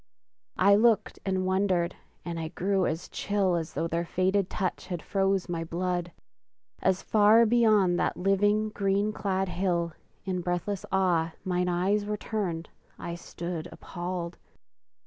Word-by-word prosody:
I 200 +2 +6
looked 220 +1 +3
and 190 -1 0
wondered, 185 -2 +1 0.3
and 170 -1 -4
I 160 - -3
grew 190 +3 0
as 160 +2 -3
chill 200 -2 0
As 165 -2 -4
though 165 +4 0
their 170 +1 -1
fated 185 +2 +1
touch 185 -3 -3
had 180 -2 -3
froze 195 -1 +1
my 170 -2 -2
blood; 175 +1 -2 0.7
As 190 0 +1
far 215 +2 +5
beyond 215 -6 +4
that - - 0
living, 205 +3 +2
green 200 0 0
clad 195 -2 -1
hill, 175 -2 -1 0.3
In 185 -2 -1
breathless 180 +3 -2
awe, 175 -4 +2
mine 180 -1 0
eyes 190 +4 +1
were 210 0 -1
turned, 185 -7 -3 0.3
I 170 - -5
stood 170 -1 -5
Appalled! 175 -1 -5
185 Hz, 145 wpm, -28 LUFS, 175-200 Hz, 0.7 s, I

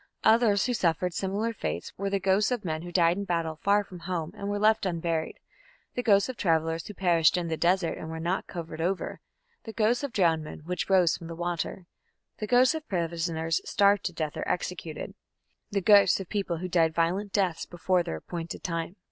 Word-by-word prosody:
Others 220 -3 +4
who 250 - 0
suffered 180 -3 0
similar 205 +5 -1
fates - - -4
were 200 +1 -2
the 200 0 0
ghosts 195 +2 +2
of 245 -6 -2
men 155 -2 -2
who 175 +1 -8
died 170 0 +3
in 200 - -2
battle 165 -4 -2
far 205 +1 +3
from 185 -3 -11
home 170 -2 -3
and 200 -1 -5
were 205 - -1
left 215 -1 +3
unburied, 165 -2 -2 0.6
the 245 - -1
ghosts 200 -4 +4
of 260 - -5
travellers 165 -2 0
who 210 - -8
perished 175 -3 +3
in 170 -2 -2
the 160 - 0
desert 175 +1 +1
and 160 - -6
were 160 0 -5
not 175 +4 -2
covered 165 -2 -6
over, 185 +3 -2 0.4
the 225 - -8
ghosts 230 +4 +1
of 285 - -3
drowned 165 -6 +2
men 155 - -9
which 180 +2 -3
rose 185 -4 +4
from 165 - -9
the 165 - -6
water, 175 +1 -3 0.5
the 215 - -3
ghosts 250 +5 +5
of 315 -1 -6
prisoners 165 -2 -1
starved 200 0 +3
to - - -1
death 155 -3 -4
or - - -3
executed, 175 -3 -4 0.6
the 200 -2 -1
ghosts 200 +1 +6
of 190 - -6
people 195 -4 -2
who 185 +3 -4
died 165 -3 +2
violent 185 +5 0
deaths 185 -5 0
before 180 +1 +1
their 80 - -4
appointed 170 - -6
time. 165 +1 -3
180 Hz, 205 wpm, -28 LUFS, 165-200 Hz, 0.6 s, ghosts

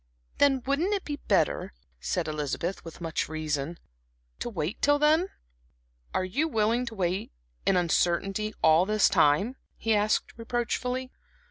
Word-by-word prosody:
"Then 270 -3 +4
wouldn't 320 +10 +1
it 395 - -3
be 290 -1 -3
better," - - +1 0.3
said - - -1
Elizabeth, 155 +4 -3
with 165 +1 -10
much 165 -3 -2
reason, 155 0 -2 0.6
"to - - -3
wait 185 0 -3
till 290 0 +4
then?" 310 +5 +4 0.8
"Are 185 - 0
you 280 - 0
willing 230 -1 +1
to 230 - -6
wait 185 0 -1 0.4
in 190 - +4
uncertainty 185 +4 +1
all 160 +4 +5
this 215 -1 +4
time?" 195 - +3 0.2
he 225 - +1
asked, 210 0 +1
reproachfully. 250 +2 -2
215 Hz, 140 wpm, -28 LUFS, 170-255 Hz, 0.8 s, all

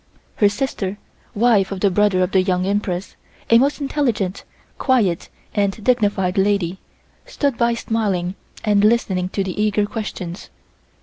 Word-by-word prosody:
Her 205 - +5
sister, 205 -4 -3 0.4
wife 210 -3 +3
of 195 -2 -4
the 200 - +3
brother 195 -1 +3
of 180 - -1
the 190 - +4
Young 185 -1 0
Empress, 195 -2 -2 0.4
a 230 - +8
most 280 +4 +1
intelligent, 245 -10 -1 0.4
quiet 220 -11 +1 0.2
and 205 0 -1
dignified 205 -6 +1
lady, 190 -2 +1 0.5
stood 285 - -1
by 235 0 +1
smiling 200 -6 -1 0.3
and 205 -2 +3
listening 195 -5 +2
to 195 - -1
the 190 +2 -3
eager 210 -1 +2
questions. 205 -4 -6
205 Hz, 140 wpm, -20 LUFS, 190-230 Hz, 0.5 s, a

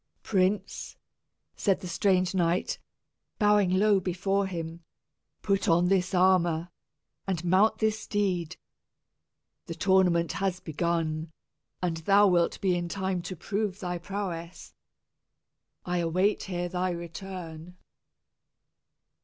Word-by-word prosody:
"Prince," 190 0 -1 0.6
said 195 -3 +1
the 185 - -6
strange 185 +2 +1
knight, 175 -1 0 0.6
bowing 210 -3 +4
low 200 +2 +4
before 195 +2 0
him, 165 -2 -6 0.6
"put 195 -2 +1
on 175 +2 +4
this 190 0 +1
armor, 175 -2 +3 0.6
and 180 -3 -2
mount 190 +5 +4
this 220 0 0
steed. 185 -6 -1 1.1
The 165 - -5
tournament 175 -2 +3
has 190 -2 -1
begun, 160 -1 -2 0.5
and 170 -2 0
thou 200 +5 +5
wilt 175 -2 +2
be 185 -2 +2
in 175 -1 -3
time 190 -1 -2
to 180 +2 -6
prove 200 +2 -3
thy 180 -3 -3
prowess. 180 -2 -6 1.1
I 180 0 -1
await 180 +5 +1
here 175 -2 -3
thy 180 +1 -1
return." 170 0 -7
180 Hz, 110 wpm, -28 LUFS, 170-195 Hz, 1.1 s, thou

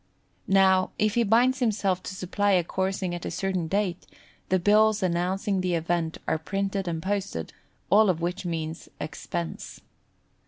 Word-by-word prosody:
Now, 190 -1 +4
if 215 -1 +2
he 240 - +2
binds 240 +4 +3
himself 200 -6 +1
to 190 - -7
supply 200 +2 0
a 180 -2 +4
coursing 190 +1 -2
at 175 - -5
a - - -3
certain 190 -4 -2
date, 190 -1 -1 0.4
the 185 - +3
bills 210 +2 +4
announcing 185 +3 0
the 180 -1 0
event 165 0 -1
are 160 - +1
printed 195 +2 -2
and 165 -1 -3
posted, 190 - -3 0.4
all 210 +1 +6
of 175 -3 +1
which 175 +3 -2
means 165 -2 -4
expense. 85 -3 -5
190 Hz, 155 wpm, -26 LUFS, 175-200 Hz, 0.4 s, all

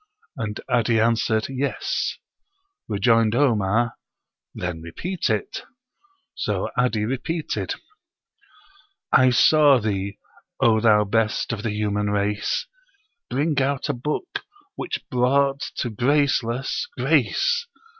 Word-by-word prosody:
And 110 -5 -4
'Adi 115 -2 +2
answered, 110 -1 +2
"Yes." 135 +1 -2 0.7
Rejoined 115 +1 +2
Omar, 115 -3 +2 0.6
"Then 90 -2 -4
repeat 160 - -3
it;" 110 -2 -2 0.7
so - - -2
'Adi 120 -4 +1
repeated: 150 +7 -3 1.4
"I 130 0 +6
saw 145 +2 +6
thee, 100 -3 -2 0.4
O 110 -2 +4
thou 105 -2 +5
best 110 +3 0
of 110 - -4
the 110 - -2
human 105 -1 -1
race, 105 - -1 0.6
Bring 145 +3 +1
out 140 +1 -1
a - - +1
book 150 - -4 0.3
which 365 - -5
brought 135 +2 +2
to 120 - -2
graceless, 135 - +1
grace. 475 -1 +2
120 Hz, 105 wpm, -23 LUFS, 105-135 Hz, 1.4 s, I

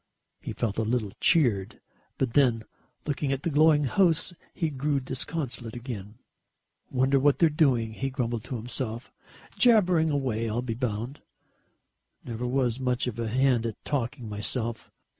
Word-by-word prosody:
He - - -6
felt 110 -2 -2
a - - +3
little 110 -2 -1
cheered. 120 - +2 0.4
But 130 -3 -1
then, 125 -6 +3 0.4
looking 145 -1 -1
at 135 0 -2
the 170 - -1
glowing 150 0 +5
house, 175 +4 +2 0.2
he 160 -3 -2
grew 140 +1 0
disconsolate 130 -2 -3
again. 115 -4 -7 0.7
"Wonder 130 +2 +2
what 145 +1 +3
they're 165 - +5
doing," 125 -7 +2
he 135 +4 -2
grumbled 120 -4 -2
to 130 - -4
himself. 115 0 -5 0.5
"Jabbering 185 -9 +5
away, 125 -6 -1
I'll 120 +3 -1
be 120 -2 -2
bound. 120 +3 -3 1.0
Never 120 +1 -4
was 125 -1 0
much 125 -1 0
of 120 -2 -4
a 115 - -1
hand 125 0 +2
at 115 - -4
talking 125 -3 -2
myself. 110 +2 -3
125 Hz, 150 wpm, -27 LUFS, 115-145 Hz, 1.0 s, glowing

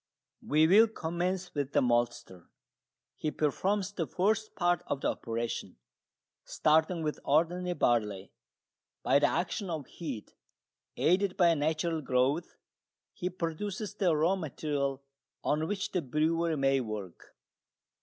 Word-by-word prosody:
We 155 +2 +3
will 210 +7 +7
commence 180 -1 -3
with 145 -1 -3
the - - +4
maltster. 120 -7 -1 0.7
He 155 - -1
performs 190 +7 0
the 170 -6 -3
first 215 - 0
part 175 -1 +2
of 140 - -2
the - - +1
operation. 115 -1 -4 0.7
Starting 160 +2 +2
with 150 -1 -2
ordinary 175 +4 +1
barley, 105 - 0 0.7
by - - +4
the 145 - +4
action 185 +3 -2
of 155 -5 -3
heat, 135 -10 -7 0.6
aided 185 +2 +2
by 175 -3 +5
natural 160 +2 0
growth, 135 +5 0 0.6
he 180 -1 -3
produces 185 +4 -4
the 185 -6 +2
raw 165 +5 +3
material 140 -5 -2 0.4
on 155 +2 0
which 205 +2 -3
the 180 - 0
brewer 160 +3 0
may 135 0 +3
work. 105 -6 -7
160 Hz, 125 wpm, -30 LUFS, 140-180 Hz, 0.7 s, will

